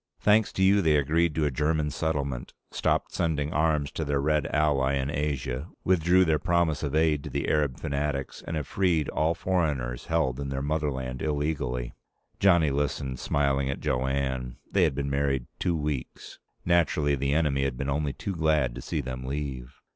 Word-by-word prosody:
"Thanks 105 0 +4
to 95 - +1
you, 100 +1 +5
they 80 -4 +3
agreed 75 +3 +2
to 80 - +1
a 75 - +1
German 75 +2 0
settlement, 70 -4 -2 0.2
stopped - - 0
sending 80 -3 -1
arms 75 -2 +1
to 80 - -3
their 70 -2 0
Red 75 0 +1
ally 70 -3 +2
in 70 +1 -1
Asia, 70 -1 -2 0.2
withdrew 90 +1 +4
their 80 -2 +2
promise 85 -3 +1
of 75 -1 -2
aid 80 -2 +2
to - - -6
the 70 +1 -2
Arab 75 -4 +1
fanatics, 70 -2 -3
and 80 - -3
have 75 -3 -2
freed 85 -5 +1
all 80 +2 +1
foreigners 75 -9 -1
held 80 -6 0
in 70 -1 -3
their 70 0 -3
motherland 70 -4 -2
illegally." 70 -5 -2 0.5
Johnny 85 -6 +4
listened, 70 -2 -2
smiling 70 -1 +1
at 70 - -3
Jo 65 +1 0
Anne. 65 -2 -2 0.2
They 95 -3 +4
had 75 -5 0
been 70 0 -2
married 70 -2 0
two 85 - +1
weeks. 75 -4 -5 0.3
Naturally, 80 -4 +2
the 70 +1 0
enemy 75 -4 +1
had 65 -2 -2
been 70 - -3
only 70 0 -1
too 100 - -4
glad 80 -7 +1
to - - -7
see 75 - -2
them 65 -1 -6
leave. 65 -2 -5
75 Hz, 185 wpm, -27 LUFS, 70-80 Hz, 0.5 s, you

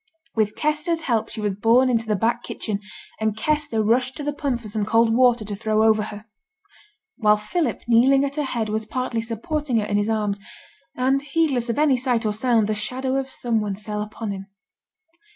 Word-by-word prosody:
With 215 -2 0
Kester's 305 +2 0
help 230 -7 0
she 220 - -6
was 205 -2 0
borne 230 +6 +4
into 230 -3 +1
the 210 - +1
back 230 +4 0
kitchen, 210 -4 -4 0.4
and 220 -1 -1
Kester 295 -7 0
rushed 250 +4 +1
to 295 - -5
the 295 0 -1
pump 275 -5 -2
for 220 - -9
some 210 0 -2
cold 225 +2 +3
water 245 -3 +4
to 205 0 -4
throw 215 +1 +1
over 220 -1 +4
her. 210 0 -7 0.9
While 210 -4 +4
Philip, 240 +6 -2
kneeling 265 +4 +5
at 280 0 -4
her - - +1
head, 235 -4 -2
was 215 0 -2
partly 250 -1 -2
supporting 245 +4 -2
her 210 - +1
in 205 - 0
his 205 +1 0
arms, 210 -2 0 0.6
and 265 +2 +2
heedless 280 -5 0
of 230 - -1
any 290 -3 +4
sight 245 -2 0
or 210 - +1
sound, 225 0 +2
the 215 - 0
shadow 260 +5 -2
of 270 0 -2
some 235 -4 -1
one 205 -2 -2
fell 210 +1 -5
upon 215 0 -5
him. 195 0 -7
230 Hz, 205 wpm, -23 LUFS, 215-260 Hz, 0.9 s, kneeling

